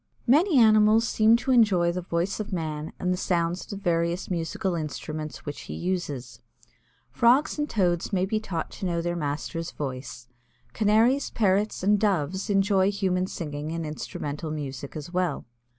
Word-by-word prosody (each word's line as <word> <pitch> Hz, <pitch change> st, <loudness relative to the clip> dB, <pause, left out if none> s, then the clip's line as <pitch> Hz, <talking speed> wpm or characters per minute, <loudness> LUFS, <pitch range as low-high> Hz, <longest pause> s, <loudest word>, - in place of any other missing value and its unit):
Many 300 Hz, +6 st, +4 dB
animals 220 Hz, 0 st, +5 dB
seem 220 Hz, +1 st, +4 dB
to 260 Hz, +2 st, -2 dB
enjoy 200 Hz, -8 st, +4 dB
the 180 Hz, +1 st, -3 dB
voice 175 Hz, +3 st, -2 dB
of 215 Hz, 0 st, -5 dB
man 155 Hz, -3 st, -3 dB
and 180 Hz, 0 st, 0 dB
the -, -, -2 dB
sounds 175 Hz, -1 st, 0 dB
of -, -, -26 dB
the -, -, -4 dB
various 170 Hz, -1 st, -1 dB
musical 175 Hz, +2 st, -2 dB
instruments 155 Hz, -1 st, -5 dB
which 145 Hz, -, -6 dB
he -, -, -4 dB
uses. 160 Hz, -9 st, -4 dB, 0.7 s
Frogs 245 Hz, -, +3 dB
and 295 Hz, -, -1 dB
Toads 175 Hz, -5 st, 0 dB
may 185 Hz, -2 st, +1 dB
be 215 Hz, +3 st, -1 dB
taught 175 Hz, -7 st, -4 dB
to 190 Hz, -, -4 dB
know 170 Hz, -1 st, -1 dB
their 175 Hz, 0 st, -1 dB
master's 160 Hz, +1 st, -3 dB
voice. 130 Hz, -3 st, -6 dB, 0.5 s
Canaries, 225 Hz, +6 st, +3 dB
Parrots, 205 Hz, -2 st, +1 dB
and 205 Hz, +1 st, +4 dB
Doves 190 Hz, -1 st, 0 dB
enjoy 195 Hz, -1 st, +3 dB
human 185 Hz, -2 st, 0 dB
singing 150 Hz, -3 st, -5 dB
and 165 Hz, 0 st, -3 dB
instrumental 150 Hz, 0 st, -5 dB
music 140 Hz, -2 st, -6 dB
as 155 Hz, +3 st, -7 dB
well. 180 Hz, -5 st, -1 dB
180 Hz, 165 wpm, -26 LUFS, 155-210 Hz, 0.7 s, animals